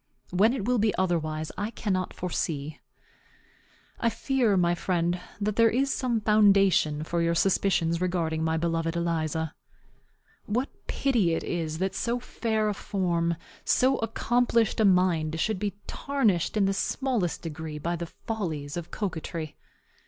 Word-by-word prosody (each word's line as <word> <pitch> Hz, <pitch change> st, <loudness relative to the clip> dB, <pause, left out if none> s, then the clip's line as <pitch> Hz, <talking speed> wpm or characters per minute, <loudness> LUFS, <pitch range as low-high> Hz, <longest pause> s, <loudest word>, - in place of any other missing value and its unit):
When 200 Hz, +6 st, +4 dB
it 220 Hz, -7 st, -3 dB
will 245 Hz, 0 st, +2 dB
be 215 Hz, 0 st, +2 dB
otherwise 155 Hz, -4 st, -1 dB
I 205 Hz, -, -1 dB
cannot 190 Hz, -5 st, -2 dB
foresee. 155 Hz, -4 st, -3 dB, 1.2 s
I 235 Hz, -, +2 dB
fear, 230 Hz, -2 st, +1 dB
my 175 Hz, -1 st, +3 dB
friend, 175 Hz, 0 st, 0 dB, 0.2 s
that 210 Hz, 0 st, -1 dB
there 230 Hz, 0 st, +6 dB
is 270 Hz, +4 st, +1 dB
some 240 Hz, -4 st, 0 dB
foundation 195 Hz, -7 st, +4 dB
for 170 Hz, +2 st, -1 dB
your 170 Hz, 0 st, +1 dB
suspicions 170 Hz, -2 st, +2 dB
respecting 165 Hz, -3 st, 0 dB
my 160 Hz, 0 st, +1 dB
beloved 165 Hz, 0 st, -1 dB
Eliza. 160 Hz, -2 st, -1 dB, 0.9 s
What 245 Hz, +6 st, 0 dB, 0.2 s
pity 220 Hz, -12 st, +1 dB
it -, -, -3 dB
is 160 Hz, -3 st, -2 dB
that 190 Hz, +2 st, -1 dB
so 240 Hz, +1 st, -1 dB
fair 220 Hz, -3 st, -1 dB
a 210 Hz, -, +1 dB
form, 170 Hz, -4 st, -1 dB, 0.3 s
so 265 Hz, +1 st, +3 dB
accomplished 230 Hz, 0 st, +1 dB
a 220 Hz, -, +4 dB
mind, 175 Hz, -4 st, +2 dB
should 215 Hz, +2 st, 0 dB
be 205 Hz, -1 st, -2 dB
tarnished 225 Hz, -, 0 dB
in 200 Hz, -, +4 dB
the 195 Hz, -, +2 dB
smallest 225 Hz, -2 st, -1 dB
degree 160 Hz, -1 st, -5 dB
by 170 Hz, +3 st, -2 dB
the 170 Hz, 0 st, -5 dB
follies 160 Hz, -10 st, -4 dB
of 170 Hz, -1 st, -5 dB
coquetry! 165 Hz, -5 st, -4 dB
185 Hz, 145 wpm, -27 LUFS, 165-220 Hz, 1.2 s, there